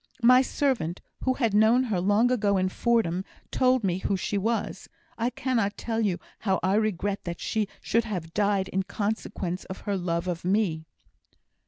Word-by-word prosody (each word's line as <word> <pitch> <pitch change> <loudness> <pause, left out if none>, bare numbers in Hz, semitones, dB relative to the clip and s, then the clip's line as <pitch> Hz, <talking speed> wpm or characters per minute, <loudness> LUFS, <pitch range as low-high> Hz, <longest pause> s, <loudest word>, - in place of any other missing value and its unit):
My 250 +2 +8
servant, 250 - -1 0.3
who 260 0 +2
had 230 -6 0
known 220 +4 +5
her 210 -8 -1
long 205 +6 +3
ago, 205 -5 +2
in 185 0 +1
Fordham, 190 -5 +1 0.3
told 255 -2 +3
me 185 -2 0
who 195 +1 0
she 195 - -3
was. 225 +4 -2 0.3
I 230 +2 0
cannot 235 -6 -1
tell 225 -1 -2 0.4
how 190 -3 +1
I 190 +1 +2
regret 205 -2 0
that 170 -1 -4
she 215 -2 -1
should 230 0 +1
have 175 -7 -5
died 200 -2 +1
in 190 - 0
consequence 200 -2 -3
of 190 - -8
her 205 - -2
love 175 -1 -1
of 175 -2 -3
me." 180 -4 0
205 Hz, 170 wpm, -27 LUFS, 185-230 Hz, 0.4 s, My